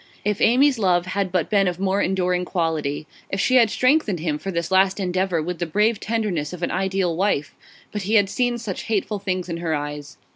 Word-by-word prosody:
If 210 -1 0
Amy's 255 +2 +4
love 180 -3 +2
had 190 0 -2
but 180 -3 0
been 200 -2 +2
of 180 0 -2
more 195 +1 +1
enduring 180 -1 0
quality; 160 -5 -2 0.2
if 195 - -2
she 255 - +3
had 230 -3 +5
strengthened 255 - +2
him 155 -2 -2
for 195 - -5
this 170 -1 -3
last 190 +1 +3
endeavour 185 -3 0
with 175 +1 -4
the 175 - -2
brave 210 +6 +1
tenderness 200 -9 -2
of 180 -1 -7
an - - 0
ideal 190 -2 0
wife! 180 -5 0 0.4
But 210 - -3
he 205 +4 0
had 205 -2 +5
seen 245 +3 0
such 215 -5 -5
hateful 210 -1 -1
things 185 -2 -2
in 170 -2 -4
her 165 -2 -1
eyes. 145 0 -6
190 Hz, 215 wpm, -22 LUFS, 170-210 Hz, 0.4 s, had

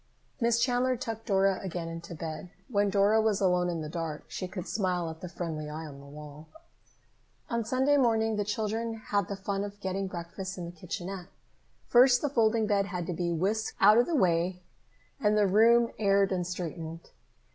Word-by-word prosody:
Miss 235 -1 +2
Chandler 250 +1 +2
tucked 225 -2 -6
Dora 195 -2 +3
again 175 -3 -4
into 165 +1 -7
bed. 160 +2 -6 0.2
When 205 -3 +2
Dora 205 +2 +4
was 215 -2 +1
alone 180 -2 +2
in 170 -2 -2
the 155 - -5
dark, 160 -1 -4
she 185 - -5
could 180 -1 -6
smile 180 -4 -1
at 160 - -12
the 180 - -6
friendly 160 -3 -4
eye 155 +2 -6
on 140 -3 -10
the 140 - -13
wall. 150 +1 -11 1.0
On 235 0 0
Sunday 260 +5 +2
morning 225 -4 +2
the 205 - 0
children 220 +2 -2
had 205 -3 -1
the 200 - -4
fun 195 0 -3
of 205 0 -7
getting 195 0 -2
breakfast 185 +2 -6
in 175 - -5
the 170 - -7
kitchenette. 180 +2 -6 0.6
First, 245 +1 +5
the 290 - +1
folding 225 -3 +2
bed 200 -2 +1
had 180 -3 -4
to 175 - -3
be 170 +1 -1
whisked 200 +7 -1
out 210 +3 +7
of 240 - +3
the 340 - 0
way, 180 - +1 0.6
and 210 0 +2
the 210 - +4
room 230 +4 +5
aired 195 -2 +3
and 180 -2 -1
straightened. 165 -2 -6
195 Hz, 190 wpm, -29 LUFS, 170-220 Hz, 1.0 s, out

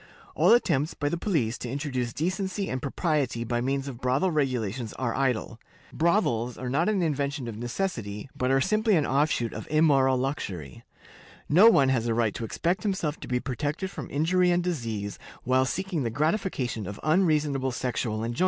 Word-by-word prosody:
All - - +4
attempts 160 - +2
by 145 - -1
the 170 - -1
police 145 - 0
to 120 - -5
introduce 130 -3 -2
decency 190 - -2
and 130 0 -2
propriety 140 -5 -1
by 120 0 -1
means 135 +2 -1
of 125 -3 -7
brothel 135 +9 +1
regulations 125 - -1
are 120 -3 -2
idle. 125 -3 -1 0.3
Brothels 125 - +1
are 125 -1 -4
not 165 +8 +2
an 200 -4 +1
invention 140 -4 -1
of 115 - -5
necessity, 115 - -3
but 125 - 0
are 135 0 +3
simply 215 - +2
an 155 -4 +2
offshoot 135 -4 +1
of - - -7
immoral 140 -4 +4
luxury.(?) 95 - -4 0.6
No 190 +10 +7
one 140 -11 +4
has 120 -3 +1
a 115 - +1
right 115 -3 +1
to - - -5
expect 170 +10 -1
himself 190 -8 -2
to - - -8
be 125 0 0
protected 145 +8 -3
from - - -7
injury 180 +5 +2
and 175 0 +2
disease 115 - -3 0.2
while 130 +1 +3
seeking 185 +2 -2
the 120 - -1
gratification 135 - -1
of 100 - -7
unreasonable 155 -5 +2
sexual 120 -3 -2
enjoyments. 120 +1 -3
135 Hz, 180 wpm, -27 LUFS, 120-165 Hz, 0.6 s, No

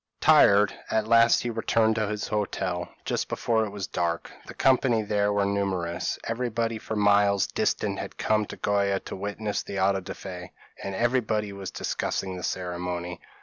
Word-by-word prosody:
p> - - -7
Tired, 100 0 +6 0.2
at 110 -1 0
last 115 0 +5
he 120 - -2
returned 115 0 +2
to 110 -2 0
his 105 0 -3
hotel, 95 -4 -2 0.2
just - - -1
before 110 -1 +1
it - - -5
was 100 -1 -5
dark. 85 -3 -2 0.2
The - - -9
company 125 -4 +3
there 105 0 +1
were 100 -1 +1
numerous; 95 -4 -1
everybody 115 -1 -2
for 110 - -5
miles 100 -1 +4
distant - - -1
had - - -7
come 110 -1 +1
to - - -8
Goa 100 -1 +1
to - - -7
witness 105 +2 -3
the 100 - -5
auto 95 +1 +3
da 95 - -7
fe, 90 -2 -8 0.3
and 95 - -4
everybody 110 -3 0
was 100 -1 -6
discussing 95 -1 -3
the 90 - -6
ceremony. 90 -1 -4
100 Hz, 175 wpm, -26 LUFS, 95-110 Hz, 0.3 s, Tired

